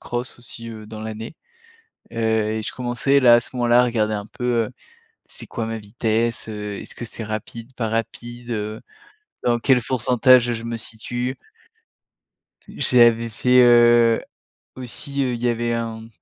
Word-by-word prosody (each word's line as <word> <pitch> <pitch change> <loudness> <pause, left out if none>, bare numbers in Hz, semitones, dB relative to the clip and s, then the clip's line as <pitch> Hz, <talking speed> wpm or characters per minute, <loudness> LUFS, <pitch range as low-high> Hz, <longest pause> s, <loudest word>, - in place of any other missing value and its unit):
cross 120 +1 -5
aussi, 115 -1 -10
heu, 110 -1 -9
dans 110 0 -9
l'année. 110 +5 -7 0.8
Heu - - -6
et 110 -1 0
je - - -4
commençais 125 +3 +1
là, 125 -3 +7
à 120 - +2
ce 125 - -9
moment-là, 120 0 +4
à - - +4
regarder 110 -3 0
un 105 -1 -3
peu, 120 0 -1
heu, - - -10 0.6
c'est - - -11
quoi 115 -2 -4
ma 115 0 -3
vitesse? 115 +2 -2
Heu, 105 -2 -5
est-ce - - -11
que - - -7
c'est 115 -1 -7
rapide, 115 +3 -6
pas 115 -4 -2
rapide? 120 +1 -4
Heu, 110 0 -4 0.6
dans 120 -1 +2
quel 125 +1 +3
pourcentage 125 0 +4
je 115 -1 -4
me 115 0 -4
situe? 120 +3 -4 1.3
T - - -13
j'avais 115 -2 +4
fait, 125 +3 +4
heu, 120 -1 +6 0.6
aussi, 140 +2 -4
heu, 125 - -1
il 120 - -6
y 125 - +2
avait 120 0 0
un 115 -1 -4
115 Hz, 170 wpm, -22 LUFS, 110-120 Hz, 1.3 s, là